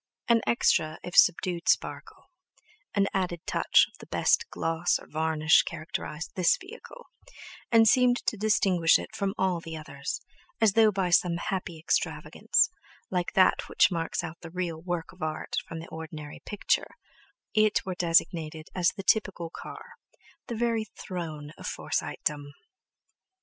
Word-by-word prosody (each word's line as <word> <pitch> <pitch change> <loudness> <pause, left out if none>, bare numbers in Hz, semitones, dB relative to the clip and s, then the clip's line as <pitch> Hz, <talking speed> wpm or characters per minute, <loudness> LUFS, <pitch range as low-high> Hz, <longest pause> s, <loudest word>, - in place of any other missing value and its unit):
An 235 -1 +4
extra, 155 -9 +2
if 180 - -7
subdued, 175 -1 +4
sparkle, - - -1 0.6
an 200 - +3
added 180 -3 -1
touch - - +4
of - - -22
the - - -12
best - - +2
gloss 165 +1 0
or - - -14
varnish 160 0 +3
characterized 155 -1 -6
this 180 -3 +3
vehicle, 470 +5 -12 0.7
and 225 -1 +6
seemed 250 +1 +5
to - - +1
distinguish 195 -5 +3
it - - -8
from 195 +1 -2
all 185 -2 +1
the 165 -1 -7
others, 140 -2 -5 0.4
as 220 -3 +4
though 220 -1 +5
by 190 -3 -1
some 170 0 +3
happy 180 -2 -4
extravagance—like 175 +2 -1
that 185 - +3
which - - +4
marks 165 -2 -2
out 160 +1 -7
the 170 - -9
real 170 -2 -4
"work 175 -2 -4
of 185 - -19
art" 155 0 -3
from 165 - -7
the 165 - -8
ordinary 155 -2 -8
"picture"—it 215 +1 -1
were 190 - -3
designated 165 -2 0
as 180 -2 +3
the 195 - -5
typical 185 -5 +1
car, - - -10 0.6
the 235 - -4
very 230 -1 0
throne 155 -5 -6
of - - -6
Forsytedom. 145 -1 -3
175 Hz, 145 wpm, -28 LUFS, 160-195 Hz, 0.7 s, and